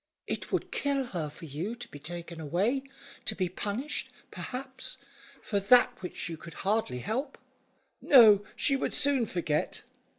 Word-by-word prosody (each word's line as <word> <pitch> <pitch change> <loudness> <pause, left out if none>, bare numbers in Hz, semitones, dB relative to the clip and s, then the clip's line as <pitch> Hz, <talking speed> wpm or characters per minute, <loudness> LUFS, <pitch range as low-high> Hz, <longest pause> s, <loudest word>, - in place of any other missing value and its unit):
"It - - -4
would - - -1
kill 280 -2 0
her 170 -9 -3
for 150 +3 -11
you 165 +10 -4
to 245 0 -8
be 145 - -10
taken 170 +2 -6
away, 195 - +1 0.4
to 215 - +1
be 185 -3 0
punished, 210 +10 -3 0.2
perhaps, 260 +1 -6 0.5
for 205 - 0
that 245 +5 +6
which 180 - -5
you 165 -1 -5
could 165 0 -11
hardly 205 - +1
help." 265 - -3 0.6
"No, 215 -7 +8
she 275 - +2
would 270 - -1
soon 275 -5 +4
forget." 160 -5 -1
205 Hz, 155 wpm, -30 LUFS, 170-250 Hz, 0.6 s, No